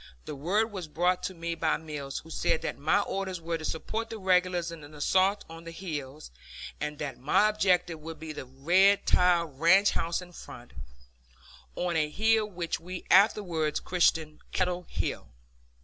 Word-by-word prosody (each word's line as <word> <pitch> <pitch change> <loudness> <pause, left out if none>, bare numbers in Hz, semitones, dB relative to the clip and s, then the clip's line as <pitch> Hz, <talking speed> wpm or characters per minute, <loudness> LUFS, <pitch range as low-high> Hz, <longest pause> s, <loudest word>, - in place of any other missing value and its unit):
The - - -5
word 195 +11 0
was 185 -5 -6
brought 180 +4 +1
to 185 - -4
me 170 0 -3
by 165 -1 0
Mills, 150 -3 -6
who 160 - -13
said 160 - 0
that - - -4
my 195 +8 +3
orders 190 -2 -3
were 165 0 -3
to - - -8
support 220 +9 -3
the 225 - -6
regulars 180 -3 +1
in 165 -2 -9
the 145 0 -12
assault 190 +6 +2
on 165 0 -11
the 165 - -8
hills, 155 - -6 0.5
and 150 0 -3
that 140 -4 -5
my 150 +10 +3
objective 180 -6 +1
would 160 +1 -8
be 160 -1 -6
the 140 - -7
red 175 +10 +3
tiled 170 -6 +2
ranch 190 +5 +5
house 165 +1 -1
in 180 -1 -10
front, 120 -7 -12 1.0
on 175 -1 -1
a 155 -2 +1
hill 220 +5 +2
which 175 -4 -3
we 180 +2 -7
afterwards 180 -6 +3
christened 160 -4 +1
Kettle 180 -1 -1
Hill. - - -3
170 Hz, 175 wpm, -29 LUFS, 155-185 Hz, 1.0 s, ranch